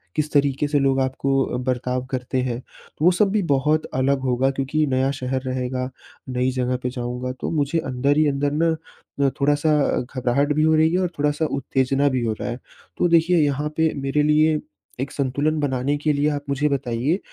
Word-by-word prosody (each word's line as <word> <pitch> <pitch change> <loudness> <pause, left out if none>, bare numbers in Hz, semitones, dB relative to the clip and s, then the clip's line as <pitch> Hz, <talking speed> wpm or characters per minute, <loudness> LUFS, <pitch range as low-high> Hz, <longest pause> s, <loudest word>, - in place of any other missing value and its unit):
किस 150 0 -1
तरीके 140 0 +2
से 145 0 +1
लोग 135 -1 +2
आपको 135 +1 0
अ, - - -3
बर्ताव 125 0 -1
करते 130 0 -1
हैं? 125 -1 -3 0.4
वो 175 +3 +6
सब 195 +3 +2
भी 215 - +2
बहुत 150 +3 +1
अलग 135 +1 +1
होगा 125 +2 +2
क्योंकि 135 +3 0
नया 135 +1 +1
शहर 130 +1 -2
रहेगा। 130 0 -2 0.4
नई 125 0 0
जगह 125 0 -1
पे 125 - 0
जाऊँगा, 125 0 -4
तो 130 - -5
मुझे 150 +1 0
अंदर 135 0 0
ही 155 0 +4
अंदर 140 +1 0
ना, 160 +2 +1 0.4
न 140 -1 +4
थोड़ा-सा 145 +2 +2 0.4
घबराहट 130 +4 +1
भी 155 +1 +1
हो 160 0 +4
रही 160 +1 +4
है। 185 - +2
और 180 - 0
थोड़ा-सा 150 +2 +1
उत्तेजना 135 +1 +1
भी 130 -2 -1
हो 110 - 0
रहा - - -3
है। 120 - -5 0.4
तो - - +3
देखिए 170 +1 +4
यहाँ 145 +1 -1
पे 160 0 +2
मेरे 135 +2 +1
लिए 155 +1 +3 0.4
एक 135 - -3
संतुलन 145 +3 0
बनाने 135 0 0
के 150 +1 0
लिए 145 +1 +1
आप 145 -1 -3
मुझे 140 +2 +1
बताइए 135 - -1
140 Hz, 195 wpm, -22 LUFS, 130-150 Hz, 0.4 s, वो